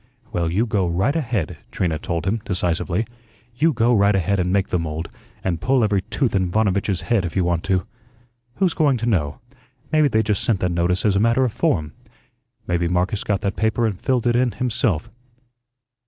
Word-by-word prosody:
"Well, 85 -1 0
you 100 +8 +1
go 100 -6 0
right 95 - +1
ahead," 115 - -2
Trina 80 -4 -1
told 85 0 -3
him, 105 +3 0
decisively; 90 +1 -1 0.5
"you 160 +5 +3
go 120 -2 +2
right 100 -2 +4
ahead 95 +1 +1
and 90 0 0
make 100 0 +1
the 90 - 0
mould, 80 0 -4 0.4
and 85 -3 -1
pull 130 +4 +2
every 100 -2 +2
tooth 115 +5 -1
in 95 -2 +1
Vanovitch's 100 -2 +1
head 100 +2 +1
if 85 - -4
you 95 - +2
want 85 -1 0
to. 95 -2 +1 0.7
Who's 185 -3 +1
going 145 -5 +2
to 115 - -3
know? 80 -11 0 0.5
Maybe 155 -1 +4
they 110 -4 +2
just 105 -2 0
sent 110 -5 +1
that 90 - +1
notice 85 +3 0
as 100 -2 +3
a - - +3
matter 115 +4 +3
of 120 - -2
form. 75 -5 0 0.7
Maybe 85 0 0
Marcus 90 +3 0
got 100 -2 -1
that 100 - -1
paper 110 +1 +1
and 110 -3 0
filled 125 +5 -1
it 120 -1 +2
in 120 -1 +2
himself." 115 - -1
100 Hz, 200 wpm, -22 LUFS, 90-115 Hz, 0.7 s, right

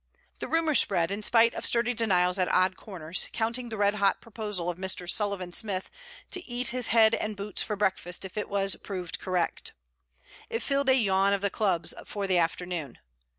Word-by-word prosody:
The - - -4
rumour 325 -1 +1
spread 175 -9 +3
in 200 +2 -3
spite 230 +2 +4
of - - -6
sturdy 240 +1 +2
denials 190 -5 +2
at 185 - +2
odd 185 0 +2
corners, 180 -4 -1
counting 235 +2 -1
the 220 - -6
red 205 0 +2
hot 200 -2 +1
proposal 210 -6 -5
of 175 0 -3
Mr. 190 -1 0
Sullivan 195 -2 -1
Smith 195 -3 -1 0.4
to 365 - -1
eat 245 +1 0
his 250 -1 -1
head 225 -1 +5
and 215 -1 -2
boots 200 +1 -3
for 210 - -1
breakfast 190 -3 -1
if 190 - -10
it 210 - -3
was 195 -1 +1
proved 180 -4 -5
correct. 180 -2 -2 0.8
It 230 0 -3
filled 275 0 0
a 260 - +6
yawn 195 -4 +2
of 200 - 0
the 200 -1 0
Clubs 180 -6 +1
for 205 -1 -5
the 185 -2 +2
afternoon. 165 -4 -3
200 Hz, 195 wpm, -27 LUFS, 185-225 Hz, 0.8 s, a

